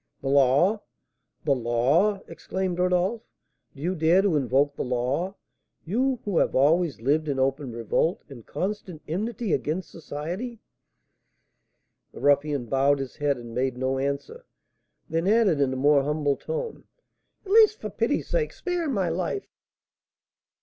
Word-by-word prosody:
"The 135 - -2
law! 140 - +4 0.6
the 145 - +3
law!" 135 - +2
exclaimed 185 -2 -3
Rodolph. 180 +5 +1 0.5
"Do 140 - -9
you 180 +3 0
dare 170 +3 +3
to 195 -6 +2
invoke 140 +1 +2
the - - -3
law? 130 +10 -1 0.5
you, 255 +9 +1
who 200 -5 +1
have - - +1
always 155 +2 +3
lived 150 +6 +1
in 140 -2 -1
open 135 0 0
revolt 115 - 0
and 130 -5 -11
constant 185 - -4
enmity 210 +4 -2
against 165 +3 -2
society?" 175 +10 -5 1.6
The - - -10
ruffian 145 -1 +2
bowed 135 +3 +2
his 135 -2 -6
head 145 -2 +1
and 120 -1 -9
made 130 0 -1
no 130 +1 -1
answer; 140 - -4 0.6
then 165 +2 -1
added, 205 -8 +3
in 135 -2 +2
a - - -2
more 140 +2 +4
humble 145 0 0
tone: 480 - -5 0.6
"At 385 - -7
least, 435 0 +6
for - - -5
pity's - - -1
sake, 475 -2 -1
spare 350 -3 -2
my 195 -9 0
life!" 185 - -2
155 Hz, 145 wpm, -26 LUFS, 135-195 Hz, 1.6 s, least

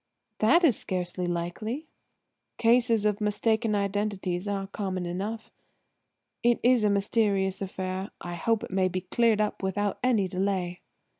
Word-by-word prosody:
"That 335 +12 +5
is 270 - +4
scarcely 180 -1 -3
likely." 175 - -3 0.7
"Cases 230 -2 +3
of 210 0 +1
mistaken 215 +1 +1
identity 200 -2 -1
are 195 -1 -2
common 190 -2 -3
enough. 200 +6 -4 0.9
It's 240 0 +3
a 210 - +4
mysterious 200 -1 +1
affair; 190 0 -4
I 175 - -6
hope 220 +6 0
it - - -7
may 190 0 +2
be 185 0 -3
cleared 220 +4 +2
up 210 - -1
without 200 +1 -1
any 225 -7 +3
delay." 185 -1 -2
200 Hz, 135 wpm, -27 LUFS, 185-220 Hz, 0.9 s, That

